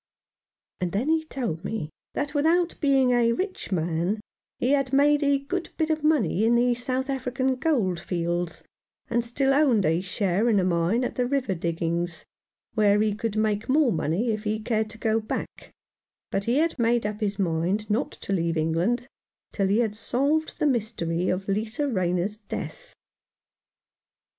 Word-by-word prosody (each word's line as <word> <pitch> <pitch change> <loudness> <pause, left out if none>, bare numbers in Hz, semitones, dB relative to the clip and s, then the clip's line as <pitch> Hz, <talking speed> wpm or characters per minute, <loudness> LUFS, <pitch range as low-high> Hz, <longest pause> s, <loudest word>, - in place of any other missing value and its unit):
And 180 -1 -2
then 235 +9 0
he 320 0 +2
told 230 - -4
me 200 -8 -4 0.2
that, 290 0 -2
without 330 +4 +2
being 270 -4 +4
a 235 -1 +3
rich 370 - -4
man, 175 +3 0 0.4
he 250 - +1
had 275 -2 +2
made 290 +2 +4
a 285 -1 +3
good 330 +6 -4
bit 315 -1 +1
of 310 -1 -1
money 245 - +2
in 230 +2 +4
the 245 +1 +3
South 255 +2 -2
African 260 -1 -1
gold 240 - +1
fields, 175 -1 -2 0.5
and 235 0 +2
still 270 +3 +1
owned 270 -8 +3
a 165 +3 +2
share 195 +3 0
in 210 -3 +4
a - - +2
mine 180 +6 +1
at - - -2
the 250 -1 +1
River 260 -6 0
Diggings, 170 0 -2 0.5
where 210 -2 +4
he 215 -1 +2
could 215 0 -3
make 215 0 0
more 280 -2 +4
money 175 +7 0
if 215 -1 -3
he 215 0 0
cared 220 -1 -1
to 220 - -9
go 220 0 +1
back; 215 - -5 0.6
but 195 - -1
he 240 +3 +2
had 320 -2 +1
made 235 -1 +2
up 210 0 -3
his 205 -2 -1
mind 185 +3 0
not 225 +6 0
to 195 - -5
leave 170 -3 0
England 170 +10 +1 0.5
till 195 -2 0
he 200 +2 +2
had 215 -3 -1
solved 280 +8 0
the - - 0
mystery 205 - 0
of 185 +1 -2
Lisa 220 +8 -1
Rayner's 185 -2 0
death. - - -7
220 Hz, 170 wpm, -26 LUFS, 185-270 Hz, 0.6 s, being